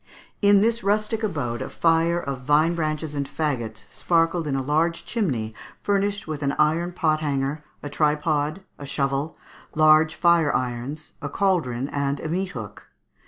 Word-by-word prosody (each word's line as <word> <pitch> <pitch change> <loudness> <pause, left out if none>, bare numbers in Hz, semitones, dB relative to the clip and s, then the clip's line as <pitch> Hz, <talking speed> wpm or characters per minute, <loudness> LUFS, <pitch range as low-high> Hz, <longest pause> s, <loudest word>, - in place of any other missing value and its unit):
In 200 -1 +6
this 230 +2 +1
rustic 215 +2 0
abode 140 - -2
a - - -4
fire 165 +1 +2
of 140 -5 -5
vine 150 +5 +3
branches 155 -2 -2
and 140 -1 -3
faggots 120 -8 -3
sparkled 165 -1 +1
in 140 - -1
a 135 - 0
large 160 +4 0
chimney 130 - -2 0.3
furnished 205 0 0
with 155 -2 -4
an 140 -1 0
iron 160 +3 +2
pot 160 -3 +1
hanger, 145 0 -2 0.2
a - - -4
tripod, 150 +3 0 0.2
a 140 - -7
shovel, 140 +2 -1 0.4
large 155 0 +5
fire 170 -4 +3
irons, 125 +5 -3
a 145 - -4
cauldron 140 -9 0
and 140 0 -1
a - - -5
meat 185 +3 -2
hook. 105 -4 -8
155 Hz, 160 wpm, -24 LUFS, 140-170 Hz, 0.4 s, In